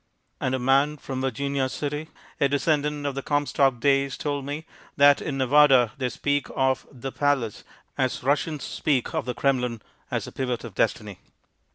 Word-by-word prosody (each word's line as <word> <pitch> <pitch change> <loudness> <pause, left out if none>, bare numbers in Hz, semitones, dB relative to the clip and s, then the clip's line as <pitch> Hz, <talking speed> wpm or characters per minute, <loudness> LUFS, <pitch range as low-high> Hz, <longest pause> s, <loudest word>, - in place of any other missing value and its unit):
And 130 0 0
a - - 0
man 135 +4 +2
from 135 -2 -5
Virginia 135 +1 -1
City, 150 +3 -4 0.3
a 140 - +3
descendant 145 0 0
of 140 - -1
the 140 - -4
Comstock 140 -3 +1
days, 135 0 +2
told 145 -2 -3
me 145 +3 -5 0.3
that 145 0 +6
in 145 -4 -3
Nevada 130 -3 +5
they 125 -1 0
speak 145 +4 -1
of 130 0 +1
"The 135 0 -6
Palace" 140 -7 0 0.4
as 130 -2 0
Russians 145 +2 0
speak 135 -5 -1
of 160 -2 -1
the 125 -1 -3
Kremlin 125 -2 0 0.3
as - - -2
a - - -9
pivot 125 -3 -3
of 115 -4 -8
destiny. - - -1
140 Hz, 170 wpm, -25 LUFS, 130-145 Hz, 0.4 s, that